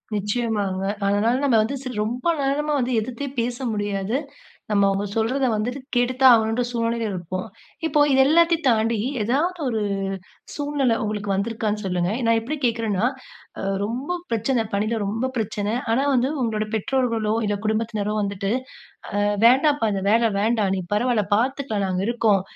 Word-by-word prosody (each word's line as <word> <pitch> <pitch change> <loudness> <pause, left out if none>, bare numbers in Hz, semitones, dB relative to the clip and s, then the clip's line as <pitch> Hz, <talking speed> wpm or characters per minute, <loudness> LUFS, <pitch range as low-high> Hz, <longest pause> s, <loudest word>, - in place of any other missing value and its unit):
நிச்சயமாங்க. 205 -2 -1 0.2
அதனால 205 +4 +2
நம்ம 255 -5 +4
வந்து 235 +6 -3
சில 255 - -5
ரொம்ப 240 +3 -4 0.2
நேரமா 295 +2 0
வந்து 250 0 0
எதிர்த்தே 255 +5 -4
பேச 240 +1 -1 0.2
முடியாது. 205 +1 -2 0.6
நம்ம 200 -1 +4
அவங்க 195 +1 -1
சொல்றத 255 +5 +1
வந்துட்டு 245 +6 -2 0.2
கேட்டு 245 +1 +2
தான் 260 -2 +9
ஆகணும்ன்ற 225 +2 +2
சூழ்நிலைல 230 -1 -1
இருப்போம். 185 +3 -4 0.4
இப்போ 300 -1 +1
இதெல்லாத்தையும் 325 +4 +4
தாண்டி 225 -1 +2 0.2
ஏதாவது 320 - 0
ஒரு 220 -2 -1 0.7
சூழ்நிலை 285 -5 0
உங்களுக்கு 210 -1 -3
வந்துருக்கான்னு 215 +1 -1
சொல்லுங்க. 180 0 0
நான் 230 0 +4
எப்டி 245 +7 -4
கேட்குறனா, 225 -3 0 0.5
அ, - - -4 0.2
ரொம்ப 255 +11 -3
பிரச்சனைல, 225 -2 0
ரொம்ப 225 +6 -1
பிரச்சனை 215 -1 -2 0.2
ஆனா, 250 +4 +2
வந்து 255 +1 +2
உங்களுடைய 215 -3 -1
பெற்றோர்களோ, 225 -2 0
இல்ல 205 - 0
குடும்பத்தினரோ 215 -1 -1
வந்துட்டு, 200 0 -2 0.7
"அ, - - +2 0.2
வேண்டாம்ப்பா, 270 0 +4
அந்த 195 - -2
வேல 230 +1 +4
வேண்டா, 220 0 +2
நீ - - -2
பரவால்ல 220 0 +2
பாத்துக்கலாம், 245 -4 -1
நாங்க 185 0 -1
இருக்கோம். 225 -5 +2
225 Hz, 145 wpm, -23 LUFS, 210-250 Hz, 0.7 s, தான்